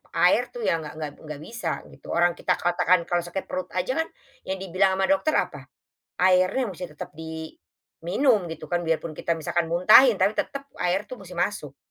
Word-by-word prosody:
air - - +4
tuh 480 - -5
ya 165 - +2
nggak 150 -2 -8
nggak 155 -2 -5
nggak 150 -1 -8
bisa 235 +5 -4
gitu - - -16
orang 175 +1 +4
kita 180 +1 0
katakan 175 0 +2
kalau 175 +1 0
sakit 175 +2 -4
perut 185 0 -4
aja 185 +7 0
kan, - - -13 0.4
yang 190 - -1
dibilang 190 0 +1
sama 190 - 0
dokter 290 +5 +2
apa? - - -1 0.5
Airnya 185 +7 +3
mesti 180 0 -7
tetap - - -7
diminum 165 - -2
gitu 160 -1 -7
kan 175 - +2
biarpun 165 -1 -1
kita 165 +2 -2
misalkan 165 +1 -1
muntahin 215 +7 +7
tapi 190 +3 +2
tetap 275 +5 -3 0.2
air 180 +3 +1
itu 210 - -16
musti 180 -2 -11
masuk, 160 -7 -2
180 Hz, 185 wpm, -25 LUFS, 165-195 Hz, 0.5 s, muntahin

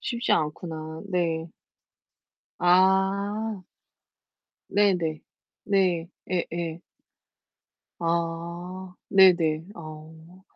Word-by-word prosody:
쉽지 235 -1 -1
않구나. 160 0 -2
네. 165 -3 -1 1.1
아. 190 +3 +2 1.1
네네. 180 -6 +2 0.4
네. 180 -4 +2 0.2
예예. 170 -2 -2 1.2
아, 170 +2 -3
네네. 170 -5 +5
아. 160 +2 -11
175 Hz, 90 characters per minute, -26 LUFS, 160-190 Hz, 1.2 s, 네네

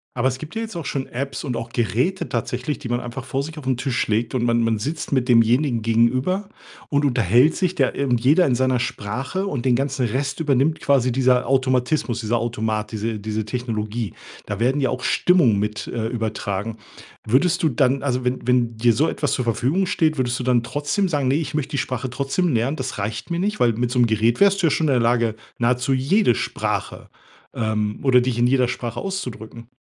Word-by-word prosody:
Aber 125 +1 +1
es 130 0 -2
gibt 155 +8 -9
ja 225 - -2
jetzt 220 -3 -7
auch 165 -3 -5
schon 135 -1 -2
Apps 135 +2 -4
und 125 -4 -3
auch 115 0 -5
Geräte 120 - -1
tatsächlich, 125 +4 -3
die 120 - -7
man 120 0 0
einfach 125 +1 -6
vor 135 +1 -2
sich 160 +2 -8
auf 135 - -9
'n 130 -2 +1
Tisch 125 -1 -1
legt 110 +2 0
und 125 -2 0
man 120 -1 +2
man 115 -1 +1
sitzt 150 +8 -4
mit 130 -2 +1
demjenigen 120 +1 +3
gegenüber 130 - +1 0.4
und 145 0 +1
unterhält 125 - +3
sich 185 -1 0
da 135 -5 +2
ir 140 - -2
und 120 -1 +2
jeder 150 +9 +4
in 125 - +2
seiner 130 0 +1
Sprache. 130 - -3
Und 140 -10 -3
den 125 -2 +4
ganzen 135 -1 0
Rest 135 +5 -2
übernimmt 150 0 +1
quasi 130 -3 +2
dieser 125 -1 +2
Automatismus, 130 -1 +1
dieser 115 +1 0
Automat, 110 -2 -2
diese 110 0 -3
diese 110 +1 -3
Technologie. 110 -3 -3 0.3
Da - - -4
werden 130 +5 +1
ja 130 - +2
auch 130 - -4
Stimmungen 160 - +3
mit, 105 0 -3
äh, 110 -2 -3
übertragen. 110 -2 -3 0.5
Würdest 165 +10 +2
du 160 - +3
dann 130 +1 +1
also 130 -2 -1
wenn 125 -1 -1
wenn 120 -2 +2
dir 120 +1 +4
so 150 +7 +2
etwas 145 - -1
zur 125 - -1
Verfügung 130 - +1
steht, 160 -5 +1
würdest 125 -1 -1
du - - -3
dann 125 -1 +2
trotzdem 145 - -1
sagen: 145 -6 0
„Ne, 130 - +2
ich 155 -3 -2
möchte 150 -1 -2
die 145 - -2
Sprache 125 0 -2
trotzdem 140 +7 -1
lernen, 120 +6 0
das 130 0 -4
reicht 105 - -4
mir 170 0 -1
nicht“? 210 +3 -1
Weil 120 -2 +3
mit 120 +2 -1
so 125 - 0
'm 120 - +5
Gerät 110 +2 +1
wärst 200 -1 +4
du - - +5
ja - - +2
schon 160 +3 +1
in 140 - +3
der 125 - +3
Lage, 115 -1 +1 0.2
nahezu 125 +2 +1
jede 135 - +3
Sprache - - -3 0.4
ähm, 105 -1 -1
oder 130 -2 +5
dich 120 -1 -1
in 120 - +4
jeder 130 -1 +3
Sprache 120 -1 -4
auszudrücken? 120 - -6
125 Hz, 220 wpm, -22 LUFS, 115-140 Hz, 0.5 s, m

